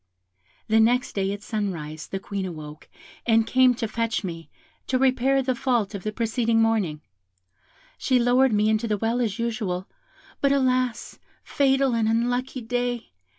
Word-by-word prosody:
The 220 Hz, +1 st, +3 dB
next 245 Hz, +3 st, +2 dB
day 195 Hz, -1 st, -1 dB
at 205 Hz, 0 st, -6 dB
sunrise 165 Hz, -8 st, -4 dB
the 195 Hz, -, -4 dB
Queen 200 Hz, 0 st, -4 dB
awoke 155 Hz, -4 st, -8 dB, 0.4 s
and 225 Hz, -1 st, +4 dB
came 255 Hz, +1 st, +4 dB
to 230 Hz, -1 st, -2 dB
fetch 225 Hz, 0 st, -2 dB
me, 165 Hz, -3 st, -6 dB, 0.4 s
to 260 Hz, -, +1 dB
repair 265 Hz, +1 st, +2 dB
the 260 Hz, 0 st, 0 dB
fault 235 Hz, -5 st, 0 dB
of 200 Hz, -, -5 dB
the 215 Hz, -, -3 dB
preceding 230 Hz, +1 st, 0 dB
morning; 210 Hz, -9 st, +1 dB, 1.0 s
she 260 Hz, -, +2 dB
lowered 250 Hz, +2 st, +4 dB
me 210 Hz, 0 st, +2 dB
into 220 Hz, +1 st, +1 dB
the 210 Hz, -1 st, 0 dB
well 230 Hz, +4 st, 0 dB
as 215 Hz, -3 st, -1 dB
usual, 220 Hz, -6 st, -2 dB, 0.5 s
but 280 Hz, -, +3 dB
alas, 255 Hz, -3 st, 0 dB, 0.2 s
fatal 270 Hz, -2 st, +2 dB
and 225 Hz, -1 st, +1 dB
unlucky 245 Hz, +3 st, -1 dB
day! 245 Hz, 0 st, -2 dB
230 Hz, 155 wpm, -24 LUFS, 205-250 Hz, 1.0 s, and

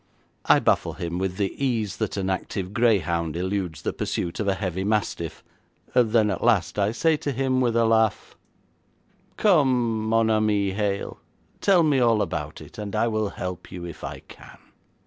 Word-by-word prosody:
I -, -, +6 dB
baffle -, -, +1 dB
him 85 Hz, +1 st, -4 dB
with 95 Hz, -1 st, -2 dB
the 100 Hz, -2 st, -1 dB
ease 110 Hz, -6 st, -1 dB
that 110 Hz, -2 st, -2 dB
an 95 Hz, -1 st, -1 dB
active 95 Hz, 0 st, -3 dB
greyhound 85 Hz, -9 st, +1 dB
eludes 90 Hz, -3 st, -3 dB
the -, -, -1 dB
pursuit 85 Hz, -, -3 dB
of 105 Hz, -, -1 dB
a 95 Hz, -, +2 dB
heavy 95 Hz, -2 st, -3 dB
mastiff, 100 Hz, -5 st, -2 dB, 0.5 s
then 110 Hz, -3 st, +3 dB
at 95 Hz, -, -4 dB
last 100 Hz, -6 st, +2 dB
I 100 Hz, +1 st, +2 dB
say 160 Hz, +7 st, +2 dB
to 145 Hz, -, -3 dB
him 130 Hz, 0 st, 0 dB
with 120 Hz, -2 st, +1 dB
a 115 Hz, 0 st, +4 dB
laugh, 110 Hz, -1 st, +1 dB, 1.0 s
'Come 125 Hz, -, +2 dB
mon 115 Hz, 0 st, +3 dB
ami 105 Hz, -2 st, +2 dB
Hale, 100 Hz, 0 st, -2 dB, 0.4 s
tell 190 Hz, -4 st, +4 dB
me 145 Hz, -4 st, +3 dB
all 115 Hz, -3 st, +3 dB
about 75 Hz, 0 st, -5 dB
it, 125 Hz, -, -12 dB
and 105 Hz, -2 st, -5 dB
I 115 Hz, -, +2 dB
will 110 Hz, -2 st, -1 dB
help 90 Hz, -1 st, -6 dB
you 90 Hz, -1 st, -7 dB
if 85 Hz, -, -9 dB
I -, -, -6 dB
can.' -, -, -15 dB
105 Hz, 175 wpm, -24 LUFS, 95-115 Hz, 1.0 s, I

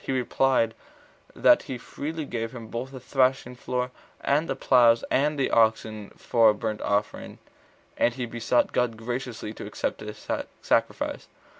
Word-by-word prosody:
He -, -, -3 dB
replied, 130 Hz, -2 st, +2 dB, 0.6 s
that -, -, +5 dB
he 130 Hz, -, -3 dB
freely 155 Hz, +5 st, -5 dB
gave 115 Hz, -3 st, -4 dB
him 115 Hz, -3 st, -9 dB
both 120 Hz, +3 st, -4 dB
the 135 Hz, -1 st, -9 dB
thrashing 130 Hz, 0 st, +1 dB
floor 125 Hz, 0 st, -3 dB, 0.3 s
and 150 Hz, +4 st, +1 dB
the -, -, 0 dB
ploughs 120 Hz, -3 st, +4 dB
and 150 Hz, +2 st, +2 dB
the 135 Hz, -, 0 dB
oxen 110 Hz, -2 st, +2 dB
for 115 Hz, -2 st, +4 dB
a 105 Hz, -, +2 dB
burnt 110 Hz, 0 st, -3 dB
offering; 105 Hz, 0 st, -2 dB, 0.6 s
and 120 Hz, -, +3 dB
he 125 Hz, -2 st, -3 dB
besought 120 Hz, +1 st, +1 dB
God 120 Hz, -2 st, 0 dB
graciously 120 Hz, -1 st, -5 dB
to -, -, -8 dB
accept -, -, -3 dB
his -, -, -9 dB, 0.4 s
sacrifice. -, -, 0 dB
125 Hz, 155 wpm, -26 LUFS, 115-130 Hz, 0.6 s, that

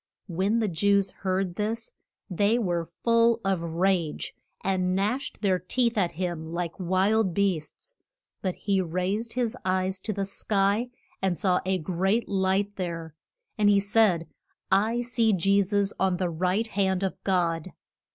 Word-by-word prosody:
When 190 Hz, +5 st, 0 dB
the 225 Hz, -2 st, +1 dB
Jews 200 Hz, +3 st, +2 dB
heard 185 Hz, -2 st, -2 dB
this 225 Hz, +2 st, -2 dB, 0.4 s
they 205 Hz, +4 st, +2 dB
were 175 Hz, -7 st, -1 dB, 0.2 s
full 230 Hz, 0 st, +4 dB
of 190 Hz, -3 st, +1 dB
rage, 170 Hz, -1 st, 0 dB, 0.3 s
and 185 Hz, -1 st, +1 dB
gnashed 215 Hz, +7 st, -2 dB
their 190 Hz, -2 st, +2 dB
teeth 235 Hz, +6 st, 0 dB
at 180 Hz, -5 st, +1 dB
him 165 Hz, -2 st, -4 dB
like 170 Hz, 0 st, -4 dB
wild 190 Hz, +2 st, +2 dB
beasts. 200 Hz, -, -2 dB, 0.4 s
But 185 Hz, -2 st, -2 dB
he 195 Hz, -2 st, 0 dB
raised 185 Hz, +6 st, -2 dB
his 240 Hz, -3 st, -1 dB
eyes 185 Hz, +1 st, 0 dB
to 215 Hz, -, -4 dB
the 200 Hz, -1 st, -2 dB
sky, 200 Hz, +3 st, 0 dB, 0.3 s
and 185 Hz, -3 st, 0 dB
saw 180 Hz, +2 st, +2 dB
a 190 Hz, 0 st, +2 dB
great 190 Hz, +6 st, 0 dB
light 195 Hz, +1 st, 0 dB
there. 165 Hz, -4 st, -4 dB, 0.5 s
And 205 Hz, -1 st, +5 dB
he 200 Hz, -1 st, +5 dB
said, 200 Hz, -5 st, +2 dB, 0.4 s
I 220 Hz, +5 st, +3 dB
see 235 Hz, -2 st, +2 dB
Je 195 Hz, +2 st, +3 dB
sus 200 Hz, 0 st, 0 dB
on 190 Hz, -2 st, +2 dB
the 180 Hz, -1 st, -1 dB
right 185 Hz, +6 st, 0 dB
hand 195 Hz, -3 st, 0 dB
of 190 Hz, 0 st, -3 dB
God. 175 Hz, -2 st, 0 dB
190 Hz, 150 wpm, -27 LUFS, 180-210 Hz, 0.5 s, And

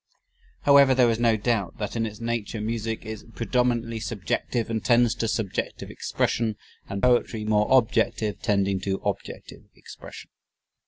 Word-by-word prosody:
However, 140 Hz, -2 st, +6 dB
there 125 Hz, -2 st, +4 dB
is 115 Hz, -, -2 dB
no 115 Hz, -2 st, +3 dB
doubt 105 Hz, -4 st, -1 dB
that 105 Hz, +1 st, -4 dB
in 115 Hz, -1 st, 0 dB
its 105 Hz, +1 st, -9 dB
nature 115 Hz, -1 st, -3 dB
music 110 Hz, +1 st, -3 dB
is 110 Hz, -1 st, -7 dB
predominantly 120 Hz, -1 st, 0 dB
subjective 115 Hz, +2 st, -2 dB
and 115 Hz, -1 st, -3 dB
tends 120 Hz, -1 st, +4 dB
to 115 Hz, -1 st, -2 dB
subjective 110 Hz, -3 st, -3 dB
expression, 110 Hz, -2 st, -1 dB, 0.3 s
and 100 Hz, 0 st, -4 dB
poetry 120 Hz, -3 st, +2 dB
more 105 Hz, -1 st, +2 dB
objective 115 Hz, -4 st, +2 dB
tending 100 Hz, -3 st, +1 dB
to 95 Hz, +1 st, -1 dB
objective -, -, -5 dB
expression. -, -, -12 dB
115 Hz, 145 wpm, -25 LUFS, 105-120 Hz, 0.3 s, However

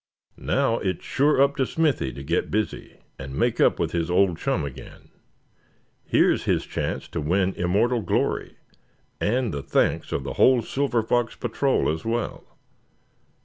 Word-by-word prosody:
Now, 115 Hz, -, +1 dB
it's 95 Hz, -4 st, -3 dB
sure 145 Hz, +1 st, +2 dB
up 140 Hz, +1 st, +3 dB
to 130 Hz, -, +2 dB
Smithy 150 Hz, -, 0 dB
to 70 Hz, -, -8 dB
get 80 Hz, +5 st, -1 dB
busy, 110 Hz, +1 st, -3 dB, 0.2 s
and 65 Hz, 0 st, -7 dB
make -, -, +1 dB
up -, -, +4 dB
with -, -, -1 dB
his 85 Hz, -1 st, -1 dB
old 90 Hz, -2 st, +2 dB
chum 115 Hz, -, -1 dB
again. 70 Hz, -, -11 dB, 0.9 s
Here's -, -, +2 dB
his -, -, +1 dB
chance -, -, -3 dB
to -, -, -3 dB
win 95 Hz, +5 st, +1 dB
immortal 110 Hz, +7 st, +1 dB
glory, 90 Hz, -, -1 dB, 0.6 s
and 120 Hz, +2 st, 0 dB
the 70 Hz, -, -3 dB
thanks -, -, 0 dB
of 70 Hz, -, -2 dB
the 70 Hz, 0 st, -5 dB
whole 125 Hz, -, +4 dB
Silver 135 Hz, -2 st, 0 dB
Fox 120 Hz, 0 st, 0 dB
Patrol 130 Hz, +3 st, 0 dB
as 80 Hz, +1 st, -2 dB
well. 115 Hz, 0 st, -4 dB
105 Hz, 155 wpm, -24 LUFS, 85-125 Hz, 0.9 s, up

